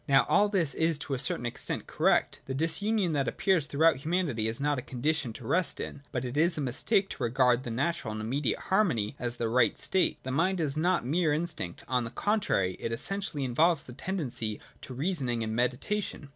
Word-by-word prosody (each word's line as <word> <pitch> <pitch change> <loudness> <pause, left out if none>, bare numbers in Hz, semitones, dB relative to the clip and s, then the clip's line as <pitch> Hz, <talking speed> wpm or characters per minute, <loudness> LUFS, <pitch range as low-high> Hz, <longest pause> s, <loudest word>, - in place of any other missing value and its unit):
Now 135 0 +5
all 205 +1 +4
this 175 -8 +1
is 160 -1 +1
to 145 -1 -4
a 130 - -1
certain 125 -2 0
extent 120 - -3
correct. - - +1
The 130 - -3
disunion 185 +4 0
that 140 -3 0
appears 185 -7 +1
throughout 160 +1 +3
humanity 145 -7 0
is 115 +3 -3
not 145 -1 +1
a - - -4
condition 135 +1 -1
to 115 - -10
rest 180 +8 0
in. 140 - -6
But 125 0 -2
it 125 +2 -5
is 165 +3 +3
a - - -1
mistake 190 - +1
to - - -8
regard 125 +1 +3
the 125 - -6
natural 135 +1 -1
and 110 - -5
immediate 125 +5 -1
harmony 160 - +1
as 120 -1 -2
the 120 -1 -1
right 120 +1 +3
state. 190 -2 +1
The 130 - -4
mind 175 +7 +1
is 150 -3 0
not 175 -1 +1
mere 160 +4 +2
instinct: 155 - -4
on 125 -1 +1
the 115 - -4
contrary, 120 - 0
it 115 - -3
essentially 165 +4 -2
involves 155 +5 +2
the 125 - -11
tendency 125 - -3 0.2
to 130 - -8
reasoning 130 -6 -1
and 110 0 -3
meditation. 140 - -1
140 Hz, 205 wpm, -29 LUFS, 120-170 Hz, 0.2 s, Now